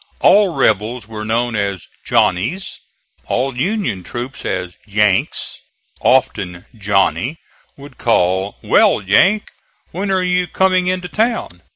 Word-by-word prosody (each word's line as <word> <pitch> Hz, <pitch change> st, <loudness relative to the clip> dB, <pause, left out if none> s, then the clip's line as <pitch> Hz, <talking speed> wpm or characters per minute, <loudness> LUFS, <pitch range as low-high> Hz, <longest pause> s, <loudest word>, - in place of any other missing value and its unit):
All 200 Hz, -4 st, +5 dB
rebels 110 Hz, +2 st, +1 dB
were 110 Hz, -1 st, -6 dB
known 115 Hz, +2 st, -1 dB
as 100 Hz, -3 st, -2 dB, 0.2 s
"Johnnies," 115 Hz, -, 0 dB, 0.5 s
all 130 Hz, +1 st, -1 dB
Union 140 Hz, -, -1 dB
troops 120 Hz, +7 st, -6 dB
as 90 Hz, -1 st, -3 dB
"Yanks." 105 Hz, -2 st, 0 dB, 0.4 s
Often 100 Hz, -9 st, +1 dB
"Johnny" 105 Hz, +8 st, 0 dB, 0.4 s
would 140 Hz, -1 st, -13 dB
call: 95 Hz, -3 st, +1 dB
"Well, -, -, +4 dB
Yank, 195 Hz, -, +3 dB, 0.4 s
when 195 Hz, +4 st, -3 dB
are 190 Hz, -1 st, +1 dB
you 180 Hz, 0 st, +1 dB
coming 185 Hz, -1 st, +2 dB
into 180 Hz, 0 st, -1 dB
town?" 220 Hz, -, -2 dB
120 Hz, 115 wpm, -17 LUFS, -, 0.5 s, All